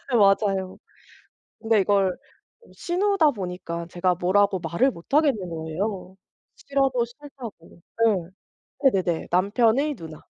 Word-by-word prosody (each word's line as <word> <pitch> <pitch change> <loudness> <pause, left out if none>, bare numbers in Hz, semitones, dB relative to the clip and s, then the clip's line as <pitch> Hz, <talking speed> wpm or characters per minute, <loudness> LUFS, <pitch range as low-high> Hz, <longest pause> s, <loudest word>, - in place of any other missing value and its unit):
맞아요. 195 -2 +2 0.8
근데 225 -2 +3
이걸 195 -1 +2
어 470 - -22
시누다 360 -3 +2
보니까 180 -5 -5
제가 180 0 +1
뭐라고 190 +2 +2
말을 170 +11 +1
못하겠는 250 - 0
거예요, 180 +4 -4 0.4
싫어도 270 -3 0
싫다고. 240 - -12 0.2
네. 185 -6 +1 0.6
네네네. 175 -4 -1
남편의 230 +10 +2
누나. 160 -5 -10
200 Hz, 250 characters per minute, -24 LUFS, 180-250 Hz, 0.8 s, 근데